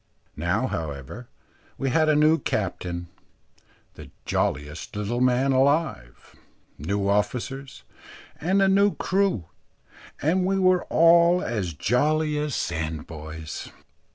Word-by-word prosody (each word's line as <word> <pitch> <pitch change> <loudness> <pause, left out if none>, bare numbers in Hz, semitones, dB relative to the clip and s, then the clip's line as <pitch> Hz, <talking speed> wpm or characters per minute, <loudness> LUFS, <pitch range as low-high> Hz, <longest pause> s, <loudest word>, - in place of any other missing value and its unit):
Now, 90 - 0
however, 80 - -6 0.5
we 135 -1 -1
had 155 +3 +3
a 155 - +4
new 155 +2 +4
captain, 90 -3 -3 0.8
the - - -12 0.2
jolliest 75 - -2
little 105 +4 -2
man 130 +2 +3
alive; 135 - 0 0.4
new 100 +7 -1
officers, 125 +6 -2 0.5
and 190 +5 +2
a - - +4
new 200 +1 +3
crew, 190 - 0 0.7
and 180 +5 +1
we 195 +1 +1
were 185 -1 +3
all 170 +2 +5
as 95 -9 -3
jolly 150 - +1
as 150 -2 -2
sandboys. 80 -1 -5
125 Hz, 110 wpm, -25 LUFS, -, 0.8 s, all